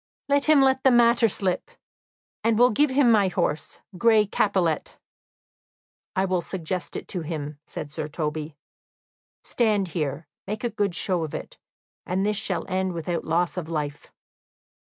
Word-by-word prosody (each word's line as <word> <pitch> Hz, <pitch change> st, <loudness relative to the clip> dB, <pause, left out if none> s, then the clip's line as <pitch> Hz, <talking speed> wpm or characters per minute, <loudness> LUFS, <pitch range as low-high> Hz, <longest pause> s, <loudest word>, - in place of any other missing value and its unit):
"Let 285 Hz, 0 st, +2 dB
him 310 Hz, -2 st, +6 dB
let 265 Hz, 0 st, +2 dB
the 265 Hz, -, +6 dB
matter 235 Hz, -1 st, +5 dB
slip, 190 Hz, -, -2 dB, 0.7 s
and 225 Hz, -1 st, +2 dB
will 245 Hz, +2 st, +6 dB
give 290 Hz, +7 st, +3 dB
him 260 Hz, -2 st, +4 dB
my 205 Hz, -3 st, +4 dB
horse, 160 Hz, -4 st, -2 dB, 0.2 s
Gray 220 Hz, -2 st, +5 dB
Capilet." 190 Hz, -6 st, 0 dB, 1.2 s
"I 190 Hz, -, +2 dB
will 185 Hz, -2 st, 0 dB
suggest 180 Hz, 0 st, -4 dB
it -, -, -6 dB
to 180 Hz, -, -2 dB
him," 150 Hz, -2 st, -5 dB
said 150 Hz, -2 st, -7 dB
Sir 155 Hz, 0 st, -4 dB
Toby. 150 Hz, 0 st, -4 dB, 0.9 s
"Stand 210 Hz, -5 st, +1 dB
here, 150 Hz, -1 st, -3 dB, 0.2 s
make 210 Hz, +3 st, -4 dB
a 240 Hz, -, -1 dB
good 200 Hz, -4 st, -1 dB
show 180 Hz, -1 st, 0 dB
of 155 Hz, -, -5 dB
it; -, -, -8 dB, 0.5 s
this 195 Hz, +3 st, 0 dB
shall 220 Hz, -, -1 dB
end 190 Hz, -1 st, -1 dB
without 170 Hz, +1 st, -3 dB
loss 170 Hz, +3 st, 0 dB
of 165 Hz, -3 st, -4 dB
life." 150 Hz, -3 st, -4 dB
185 Hz, 155 wpm, -25 LUFS, 160-220 Hz, 1.2 s, him